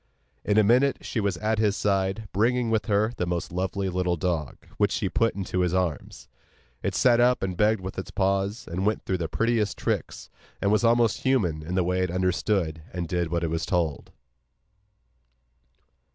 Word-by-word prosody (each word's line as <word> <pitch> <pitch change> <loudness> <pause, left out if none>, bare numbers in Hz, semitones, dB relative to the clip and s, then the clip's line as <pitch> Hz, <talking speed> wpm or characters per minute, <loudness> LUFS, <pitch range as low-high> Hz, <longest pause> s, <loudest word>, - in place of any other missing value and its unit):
In 105 - +1
a 110 - +6
minute 125 +6 +3
she 115 - -3
was 100 -4 0
at 110 +2 0
his 105 -2 +2
side, 100 +1 0
bringing 120 +3 +1
with 110 +1 0
her 105 +2 +2
the 90 - -1
most 85 0 -3
lovely 95 +2 -2
little 90 -1 0
dog, 80 -3 -2 0.2
which - - +2
she - - -1
put 115 0 +1
into 95 -2 -3
his 90 0 +1
arms. 90 -5 -3 0.5
It - - -2
sat 120 -2 +4
up 125 -2 +3
and 95 -1 -2
begged 105 +2 +2
with 95 0 -5
its 95 - -6
paws, 100 +3 -1
and 90 +3 -3
went 105 +2 0
through 95 -2 -1
the 85 - -2
prettiest 110 -5 0
tricks, - - -3 0.3
and 100 - +1
was 110 +2 +2
almost 115 -2 +3
human 100 - +1
in 85 +4 -5
the 95 - +2
way 90 +1 0
it 90 - 0
understood 90 -2 0
and 90 -2 -4
did 85 0 -1
what 85 0 -1
it 80 - -1
was 80 0 -1
told. 85 -7 -1
95 Hz, 190 wpm, -26 LUFS, 90-110 Hz, 0.5 s, a